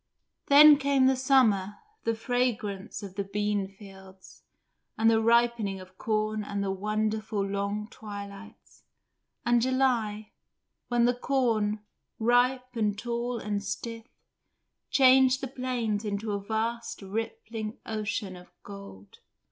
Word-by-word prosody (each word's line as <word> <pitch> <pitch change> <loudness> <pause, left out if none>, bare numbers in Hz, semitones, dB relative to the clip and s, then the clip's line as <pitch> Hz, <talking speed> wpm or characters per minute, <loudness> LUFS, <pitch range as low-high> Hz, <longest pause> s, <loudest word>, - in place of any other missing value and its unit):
Then 295 +1 +9
came 280 -2 +2
the 265 0 +4
summer, 230 -7 +2 0.3
the 230 0 +1
fragrance 225 -4 -2
of 195 -2 -8
the 200 +1 -2
beanfields, 195 -1 -5 0.6
and 225 +1 +4
the 225 0 +3
ripening 230 -4 +2
of 185 0 -14
corn 215 -1 -1
and 200 -1 -3
the 195 - -1
wonderful 215 +1 -1
long 200 +1 -3
twilights, 205 -1 -10 0.6
and 240 0 +3
July, 235 -5 0 0.6
when 240 -1 +2
the 245 - +3
corn, 230 -5 0 0.4
ripe 250 +2 +2
and 210 -3 0
tall 235 +2 -3
and 205 -2 -3
stiff, 225 +3 -5 0.8
changed 260 -1 +5
the 270 - -4
plains 245 -5 -2
into 210 +1 -3
a 200 - -1
vast 225 +2 -3
rippling 220 +1 -5
ocean 215 -3 -3
of 180 0 -14
gold. 200 - -12
220 Hz, 120 wpm, -28 LUFS, 200-240 Hz, 0.8 s, Then